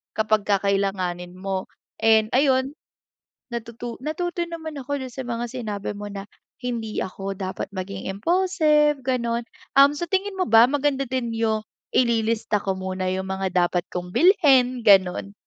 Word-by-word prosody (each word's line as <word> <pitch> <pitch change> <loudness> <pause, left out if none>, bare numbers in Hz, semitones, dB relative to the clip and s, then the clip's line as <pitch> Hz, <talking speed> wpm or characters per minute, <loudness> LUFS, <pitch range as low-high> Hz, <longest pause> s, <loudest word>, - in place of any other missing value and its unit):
kapag 215 -1 +1
kakailanganin 195 -3 0
mo. 190 0 -3 0.3
And, 220 0 +4
ayun, 265 0 +3 0.8
natutu 235 0 -6
natuto 345 +3 -2
naman 325 -2 -7
ako 285 +2 -3
do'n 260 - -5
sa 265 -2 -6
mga 240 0 -3
sinabi 215 -6 -4
mo 205 0 -6
na, 200 0 -7 0.3
hindi 230 -3 -3
ako 195 +1 -5
dapat 190 -1 -4
maging 190 +1 -5
impulsive, 300 - +2
gano'n. 240 -2 -1 0.4
Um, 280 +1 +7
sa 345 - -2
tingin 385 +1 0
mo 370 - +2
ba, 225 -1 +7
maganda 285 -1 +1
din 250 -2 -2
yung 220 -1 0 0.3
ililista 225 -3 +1
ko 195 -1 -1
muna 185 0 -3
yung 190 +1 -2
mga 190 0 -2 0.2
dapat 175 0 -2
kong 180 0 -5
bilhin, 270 - +4
gano'n? 195 0 +4
230 Hz, 145 wpm, -23 LUFS, 195-275 Hz, 0.8 s, Um